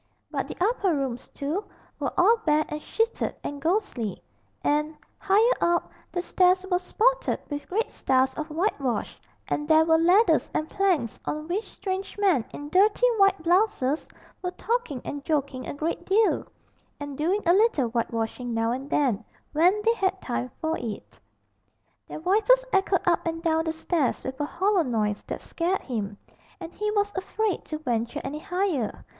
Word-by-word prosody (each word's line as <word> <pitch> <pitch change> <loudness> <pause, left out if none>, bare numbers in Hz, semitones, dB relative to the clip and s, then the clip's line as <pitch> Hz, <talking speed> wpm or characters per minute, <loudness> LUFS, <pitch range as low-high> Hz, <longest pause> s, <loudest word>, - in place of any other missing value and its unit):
But - - -2
the - - -7
upper 385 -3 +2
rooms, 260 -3 -3
too, 305 +8 -3 0.4
were - - -1
all 430 +6 +6
bare 305 -7 +2
and 300 0 -4
sheeted 450 +7 -1
and 285 -1 -5
ghostly, 320 - -1 0.4
and, 300 +1 +1 0.2
higher 435 +5 +4
up, 345 0 +1 0.2
the 355 - -2
stairs 370 +1 +3
were 360 - +3
spotted - - +1
with 290 0 -5
great 435 +5 -1
stars 260 0 +2
of 310 +3 -5
whitewash, 300 - -1 0.3
and 295 - -2
there 315 0 +5
were 320 0 +4
ladders 365 +7 +4
and 310 - 0
planks 360 - 0
on 305 +1 -3
which 390 +6 -2
strange 385 +1 -4
men 375 - +3
in 290 0 -7
dirty 410 +8 +4
white 390 -4 +4
blouses 345 -6 +2 0.3
were 360 - -1
talking 435 - -2
and 285 -1 -5
joking 280 -4 -1
a - - -4
great 315 +4 -2
deal, 420 +3 +3 0.5
and 290 -1 -6
doing 355 +9 0
a 340 - +5
little 385 - +3
whitewashing 230 +1 -2
now 225 0 +1
and 265 +3 -4
then, 245 -9 +1 0.3
when 360 +7 +3
they 460 - +5
had 385 -4 0
time 250 -3 -3
for 320 0 -1
it. 225 -4 -7 0.9
Their - - -7
voices 440 +8 +4
echoed 385 -1 +3
up 345 -1 +3
and 330 0 -3
down 320 -1 +2
the 320 - 0
stairs 320 -3 -1
with 260 0 -5
a - - +1
hollow 375 +5 +1
noise 215 -7 -1
that - - -5
scared 355 +3 -1
him, 210 -5 -4 0.4
and 340 -1 -8
he 425 +1 -2
was 410 -1 +1
afraid 385 +1 -1
to 310 - -4
venture 235 -6 -2
any 300 +2 -4
higher. 350 - -2
330 Hz, 170 wpm, -26 LUFS, 280-390 Hz, 0.9 s, all